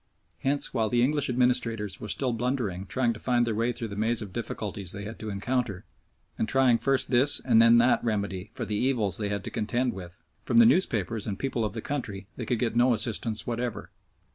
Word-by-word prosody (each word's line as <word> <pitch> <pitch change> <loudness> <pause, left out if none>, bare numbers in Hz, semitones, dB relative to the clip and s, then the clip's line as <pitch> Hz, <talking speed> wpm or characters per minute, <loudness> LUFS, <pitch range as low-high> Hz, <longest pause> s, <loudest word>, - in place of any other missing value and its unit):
Hence, 140 +1 0
while 110 -3 +1
the 120 +2 +2
English 145 +1 +1
administrators 115 -5 0
were 105 - -6
still 130 -3 -1
blunderingly 115 -6 -2
trying 120 +2 +1
to 110 - -10
find 120 0 +1
their 115 - -1
way 115 +3 0
through 115 -1 -5
the 100 - -6
maze 110 +2 0
of 100 -3 -10
difficulties 105 -5 -4
they 100 - -6
had 105 +2 -8
to 110 - -5
encounter, 105 -1 -2 0.5
and 110 - 0
trying 130 -3 +4
first 135 0 +2
this 130 +4 +4
and 115 -3 +4
then 115 0 +7
that 120 +1 +3
remedy 100 -3 -2
for 120 - -3
the 105 - -4
evils 110 -6 0
they 105 -1 -2
had 100 -1 -3
to - - -6
contend 120 +3 -1
with, 90 -1 -10 0.2
from - - 0
the 235 - +8
newspapers 115 - +1
and 100 -3 -3
people 130 -4 -2
of 105 - -2
the 115 - -5
country 105 -9 -4
they 120 - -6
could 125 - +1
get 115 0 -1
no 120 0 +4
assistance 110 0 -1
whatever. 120 0 -4
115 Hz, 215 wpm, -27 LUFS, 105-125 Hz, 0.5 s, the